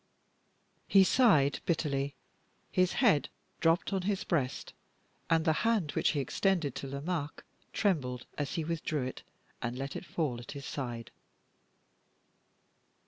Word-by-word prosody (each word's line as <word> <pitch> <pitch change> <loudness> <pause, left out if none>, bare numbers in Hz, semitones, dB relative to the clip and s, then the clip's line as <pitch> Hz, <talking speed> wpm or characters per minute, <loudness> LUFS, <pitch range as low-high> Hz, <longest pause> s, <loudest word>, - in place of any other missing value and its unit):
He 195 -1 +7
sighed 185 - +4
bitterly; 140 -4 0 0.6
his 185 0 +2
head 215 - +3 0.3
dropped 165 +4 +2
on 190 - +1
his 195 +1 -1
breast, 140 -6 -1 0.6
and 165 0 +3
the 160 - +4
hand 220 -10 +2
which - - +2
he 155 - -1
had 140 - +1
extended 165 -1 +1
to 135 - -5
Lomaque 145 +2 -3 0.3
trembled 140 - 0
as 145 -1 -3
he 165 - -1
withdrew 155 -3 -2
it 130 - -5 0.4
and 120 +1 -3
let 135 +1 -4
it - - -5
fall 145 -8 -1
at 120 - -8
his 140 -1 -7
side. 120 -4 -5
150 Hz, 140 wpm, -31 LUFS, 135-180 Hz, 0.6 s, He